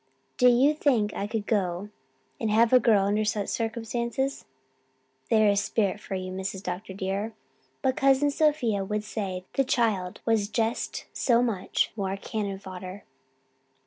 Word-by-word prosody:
Do 250 -1 +6
you 260 +5 +5
think 245 -9 +1
I 200 - -3
could 215 -1 -3
go 195 -2 -1 0.5
and 225 - -1
have 225 +3 +4
a 255 - +9
girl 215 -5 +4
under 210 +2 +1
such 210 -1 -1
circumstances?' 235 +3 -2 0.8
There 215 -1 +5
is 200 0 +3
spirit 205 -2 0
for 195 - -5
you, 185 0 -4
Mrs. 190 +1 -4
Dr. 185 +1 -5
dear. 200 +3 -2 0.5
But 260 +1 +1
Cousin 275 0 +4
Sophia 280 -10 +1
would 210 +2 -2
say 195 -4 -4
the 270 - +2
child 215 -8 0
was 225 -3 +2
just 225 +1 -2
so 240 -1 +3
much 215 -7 0
more 195 -2 -2
cannon 200 -1 -3
fodder." 185 0 -8
215 Hz, 150 wpm, -27 LUFS, 195-235 Hz, 0.8 s, a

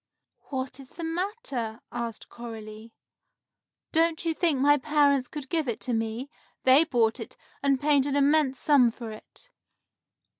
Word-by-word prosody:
"What 260 -1 -4
is 265 -1 -12
the 340 - -7
matter?" 325 - -3
asked 235 -2 -5
Coralie. 225 -1 -9 1.0
"Don't 330 0 +2
you 330 - +1
think 320 -3 +1
my 290 +2 +5
parents 285 -2 +2
could 290 -1 -7
give 320 -3 0
it 235 - -2
to 250 - -2
me? 225 +3 -2 0.4
They 265 +5 +6
bought 235 -7 +1
it, - - -8 0.2
and 275 -1 +2
paid 285 -1 +3
an 280 - -1
immense 285 -1 +3
sum 275 -5 +4
for 230 -1 -8
it." 360 - -10
270 Hz, 150 wpm, -27 LUFS, 235-305 Hz, 1.0 s, They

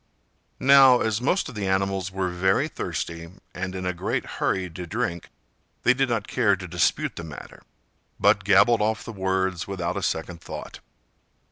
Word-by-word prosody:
'" - - -44
Now, 135 -2 +7
as 110 0 0
most 180 +9 +1
of - - -8
the 105 -3 -3
animals 95 0 0
were 95 -1 -2
very 95 +10 +1
thirsty, 85 - -5 0.2
and 95 0 -4
in 95 0 -4
a 90 - 0
great 85 - -2
hurry 95 -1 -1
to 90 +1 -8
drink, 85 +1 -3 0.5
they 125 - +5
did 135 0 0
not 115 -3 -1
care 105 -6 +2
to 95 -1 -8
dispute - - 0
the 85 - -5
matter, 75 -3 -10 0.6
but - - +4
gabbled 120 -2 +5
off 110 +1 0
the 115 - -7
words 95 -2 -1
without 95 -3 -3
a - - -2
second 85 +1 -3
thought. - - -8
95 Hz, 175 wpm, -25 LUFS, 90-110 Hz, 0.6 s, Now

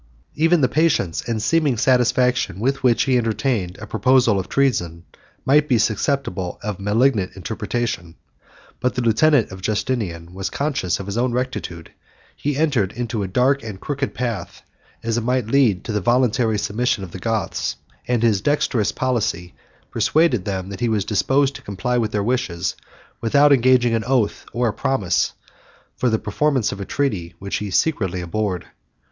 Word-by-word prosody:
Even 165 +1 +3
the 130 - +4
patience 140 - +1
and 115 -2 0
seeming 145 +2 +1
satisfaction 125 -4 +2
with 135 +4 0
which 120 -3 +3
he 130 -2 +2
entertained 110 -4 -1
a 105 - -8
proposal 120 -1 +3
of 95 - -5
treason, 85 -12 0 0.4
might 150 +2 +4
be 125 - +3
susceptible 110 -4 -1
of 105 -2 -4
a - - -9
malignant 105 -1 +1
interpretation. 105 -3 -3 0.6
But 125 - 0
the 125 - -1
lieutenant 120 +2 +3
of 95 0 -9
Justinian 100 -5 -2
was 95 +1 -3
conscious 140 - -1
of 100 - -6
his 100 +4 -3
own 125 0 +1
rectitude; 120 -10 -4 0.4
he 145 -1 -2
entered 135 -11 +1
into 120 -2 -3
a 100 - -2
dark 130 +8 +2
and 105 -4 -7
crooked 140 +2 -3
path, 115 -7 -4 0.4
as 115 0 0
it - - -5
might 125 0 0
lead 115 -6 +2
to - - -4
the 105 -1 -1
voluntary 120 0 +2
submission 105 +1 -1
of 90 - -8
the 95 - -7
Goths; 110 +2 -2 0.3
and 120 -2 +1
his 110 -4 +3
dexterous 125 -5 +1
policy 105 -9 -1 0.4
persuaded 155 - +2
them 95 -2 -3
that 100 - -7
he 120 -1 0
was 105 -3 0
disposed 135 +6 +2
to - - -15
comply 115 +3 -2
with 110 -2 0
their 105 -1 0
wishes, 100 -7 -1 0.5
without 140 +5 +5
engaging 125 -2 +4
an 115 -1 0
oath 125 -4 0
or 120 0 0
a - - -3
promise 105 -10 0 0.6
for 125 - +1
the 110 - +2
performance 130 +3 0
of 100 - -6
a - - -4
treaty 95 -13 -2
which 100 0 -3
he 105 - -4
secretly 95 - 0
abhorred. 90 +1 -2
115 Hz, 170 wpm, -21 LUFS, 100-130 Hz, 0.6 s, without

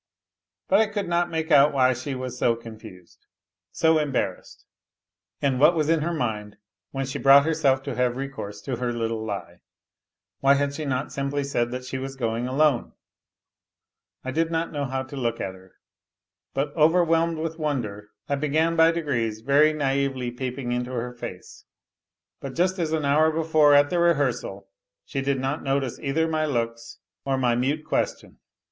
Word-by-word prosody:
But 195 - +4
I 220 - +4
could 205 -1 -3
not 175 0 +1
make 160 0 -3
out 145 0 +6
why 130 -2 +4
she 130 +3 -5
was 130 -1 -5
so 120 -2 +2
confused, 110 -6 -13 0.4
s - - -11
embarrassed, 155 -4 0 0.8
and 135 -3 +1
what 155 +5 +6
was 155 -1 0
in 165 -1 +3
her 170 +3 -1
mind 110 -9 -3 0.3
when 135 0 -3
she 135 +2 -5
brough 140 +1 +7
herself 145 -4 +1
to 140 - -4
have 125 0 0
recourse 130 -7 -6
to 130 0 -4
her 125 0 -2
little 115 -1 -2
lie? 105 -3 -6 0.8
Why 140 +1 +5
had 140 0 0
she 155 +1 -5
not 130 -2 -2
simpl 140 +1 -2
said 120 -4 0
that 125 +1 -6
she 130 +1 -4
was 135 +1 -6
going 115 -1 -2
alone? 140 -1 +1 1.3
I 130 - -4
did 165 +4 0
not 165 0 -2
know 145 -2 -2
how 130 0 -2
to 130 +2 -10
loo 130 -3 -1
at - - -17
her, 95 -1 -7 0.8
but 145 +2 -2
overwhelmed 165 +1 +3
with 165 +1 -4
wonder 110 -9 -3 0.2
I 145 - -1
began 155 +3 +1
by 165 0 +6
degrees 120 -10 -1
ver 145 +5 +4
naively 135 -4 -1
peeping 125 0 -4
into 125 0 -2
her 125 0 -3
face; 120 -7 -9 0.7
but 135 -2 -7
just 185 +2 +1
as 160 -2 -1
an 155 -2 0
hour 155 +3 +4
before 155 -2 +4
a 145 - +7
the 175 +3 -1
rehearsal 140 - 0 0.4
she 135 - -3
did 135 0 0
not 135 +3 -2
notice 135 -2 -1
either 160 +3 0
my 155 -1 0
looks 115 -3 -3 0.3
or 135 -1 0
my 125 -2 +2
mut 140 +5 0
question. 155 - -2
140 Hz, 175 wpm, -25 LUFS, 125-155 Hz, 1.3 s, brough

